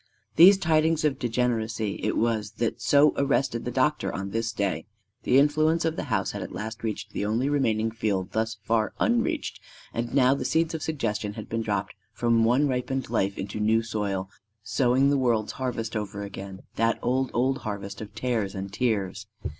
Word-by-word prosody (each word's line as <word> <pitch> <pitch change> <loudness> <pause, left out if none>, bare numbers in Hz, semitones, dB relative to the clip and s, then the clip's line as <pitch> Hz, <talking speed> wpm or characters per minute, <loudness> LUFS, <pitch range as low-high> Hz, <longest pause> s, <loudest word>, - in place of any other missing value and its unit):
These 190 +4 +9
tidings 160 -2 +2
of 145 -3 +1
degeneracy 115 -3 -1
it 110 - 0
was 110 -2 0
that 115 +1 -2
so 145 +1 +5
arrested 135 -4 +1
the - - -1
doctor 150 +4 +1
on 95 0 -4
this 115 +1 -1
day. 100 -5 -2 0.4
The 125 - +4
influence 155 +3 +3
of 160 0 0
the - - -3
house - - 0
had - - -5
at - - -6
last 110 +2 -6
reached 110 -2 -4
the - - -2
only 115 +6 0
remaining 115 -6 +1
field 105 -4 -2
thus 110 0 -1
far 110 0 +1
unreached; 235 -1 0 0.3
and 120 0 -2
now 130 -1 +4
the 140 - -2
seeds 165 0 +1
of 160 - -4
suggestion 115 -10 -2
had 110 0 -8
been 115 0 -2
dropped - - -2 0.2
from 115 -1 +2
one 125 +6 +3
ripened 130 -1 -2
life 100 -4 0
into 95 +2 -5
new 110 +2 +3
soil, 100 -4 -2 0.4
sowing 130 +4 +2
the 140 - +2
world's 115 -4 +1
harvest 120 -3 -3
over 105 -1 -3
again 95 -1 -8 0.2
that 115 0 +2
old, 130 +1 +1
old 130 +3 +1
harvest 100 -3 -5
of 105 -1 -9
tares 110 -4 -1
and 95 +1 -5
tears. 105 -4 -1
115 Hz, 185 wpm, -26 LUFS, 105-135 Hz, 0.4 s, These